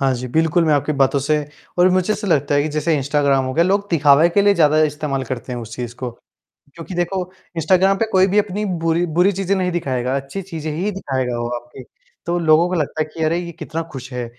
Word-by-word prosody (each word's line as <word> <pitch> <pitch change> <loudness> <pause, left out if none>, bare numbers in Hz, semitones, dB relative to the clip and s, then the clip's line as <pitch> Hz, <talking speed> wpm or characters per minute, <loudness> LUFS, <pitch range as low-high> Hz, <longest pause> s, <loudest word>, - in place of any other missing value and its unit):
हाँ 135 -1 +2
जी, 125 +1 -5
बिल्कुल, 160 +5 +2
मैं 155 -2 +3
आपकी 145 +1 0
बातों 140 -1 +2
से 150 +3 +1 0.4
और 180 +1 +6
मुझे 185 +3 +1
ऐसा 210 0 -4
लगता 145 -5 +1
है 145 - +3
कि 155 - -2
जैसे 160 +2 +1
इंस्टाग्राम 140 -1 +1
हो 130 - -3
गया, 170 - +3
लोग 200 +2 +1
दिखावे 150 0 +5
के 200 +4 +2
लिए 205 0 +4
ज़्यादा 155 -3 +4
इस्तेमाल 145 -2 -1
करते 125 +1 -6
हैं 120 - -4
उस 115 -1 -8
चीज़ 120 -1 -5
को। 125 -1 -4 0.6
क्योंकि 170 +2 -8
देखो, 175 +2 -1 0.3
इंस्टाग्राम 185 +4 +3
पे 225 - +1
कोई 190 0 +5
भी 200 +2 +1
अपनी 210 0 0 0.2
बुरी 165 +1 +2
बुरी 185 +3 +4
चीज़ें 195 0 -1
नहीं 185 -1 0
दिखाएगा, 130 -6 -1
अच्छी 140 +8 -5
चीज़ें 160 -4 -5
ही 180 +7 -2
दिखाएगा 130 -9 -3
वो 120 0 -2
आपके। 120 +2 -13 0.4
तो 175 +1 0
लोगों 165 +1 +4
को 185 - -2
लगता 155 -1 -1
है - - -2
कि 160 - -4
अरे! 165 +2 +1
ये 175 -1 -6
कितना 165 0 -5
खुश 135 -1 -8
है, 125 -1 -3
155 Hz, 240 wpm, -19 LUFS, 135-180 Hz, 0.6 s, और